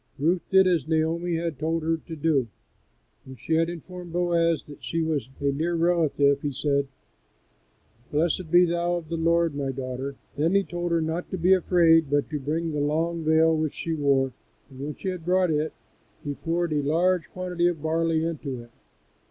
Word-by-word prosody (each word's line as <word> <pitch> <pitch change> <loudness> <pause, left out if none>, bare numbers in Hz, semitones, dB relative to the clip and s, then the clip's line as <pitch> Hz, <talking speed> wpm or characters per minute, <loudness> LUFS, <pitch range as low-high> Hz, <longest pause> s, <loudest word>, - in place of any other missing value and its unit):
Ruth 170 +5 +1
did 190 0 +6
as 170 -6 +1
Naomi 165 +2 0
had 165 -4 -3
told 160 +1 -1
her 165 +1 +1
to 165 +1 -9
do. 145 -5 +1 0.8
When 130 - -11
she 135 +7 -3
had 165 +1 +2
informed 175 0 -8
Boaz 170 -2 +1
that 145 - -13
she 165 0 -1
was 150 -6 -2
a 140 0 +1
near 165 +5 -1
relative 160 -5 +2
he 145 - -2
said, 140 +1 0 1.2
"Blessed 160 +3 0
be 175 +2 +6
thou 175 +1 0
of 165 -3 -6
the 170 - -2
Lord, 165 0 +2
my 140 -1 -2
daughter." 130 +1 -5 0.2
Then 165 +6 +1
he 200 - +4
told 175 -1 -4
her 165 -1 +2
not 160 +2 -3
to 190 - -3
be 180 +2 +4
afraid, 165 -4 +4
but 145 +2 0
to 150 - -2
bring 160 +4 -2
the 150 - -2
long 160 +3 0
veil 160 +1 +4
which 155 -2 -2
she 165 - -3
wore, 135 -4 +1 0.4
and 130 - -13
when 145 +2 -5
she 190 - -4
had 180 -3 -5
brought 180 0 +2
it 155 +1 0 0.5
he 145 - -3
poured 165 +2 -1
a 150 - +1
large 170 +5 +1
quantity 180 -1 -1
of 165 -4 -2
barley 160 0 +1
into 145 -6 -4
it. 120 0 -13
160 Hz, 195 wpm, -25 LUFS, 145-170 Hz, 1.2 s, did